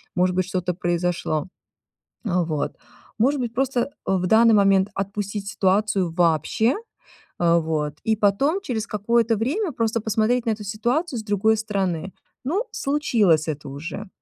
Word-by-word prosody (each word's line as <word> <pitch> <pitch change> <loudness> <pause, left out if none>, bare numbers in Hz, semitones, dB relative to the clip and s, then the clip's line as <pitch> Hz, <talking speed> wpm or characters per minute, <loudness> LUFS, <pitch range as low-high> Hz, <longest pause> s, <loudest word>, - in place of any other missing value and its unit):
может 180 0 +2
быть, 185 0 +1
что-то 180 -1 -2
произошло, 175 -3 -1 0.8
э, - - -1 0.2
вот. 155 -3 -3 0.4
Может 270 +4 +2
быть, 235 -2 -3
просто, 265 0 0
э, 260 - -2 0.3
в 180 0 -1
данный 225 +3 +6
момент 195 -1 +4
отпустить 200 +1 -3
ситуацию 195 -2 +1
вообще, 170 - +2 0.6
э, 170 -1 +4
вот, 155 -2 -2
и 220 0 +2
потом 220 - +2
через 230 - -3
какое-то 230 +2 +1
время 305 - -1
просто 230 -1 0
посмотреть 220 +3 +1
на - - +2
эту 210 -1 -6
ситуацию 240 - -1
с - - -10
другой 210 +1 +2
стороны. 195 -4 -2 0.3
Ну, 380 - 0
случилось 220 - +2
это 150 -2 -4
уже, 165 +9 -7
205 Hz, 150 wpm, -23 LUFS, 180-230 Hz, 0.8 s, данный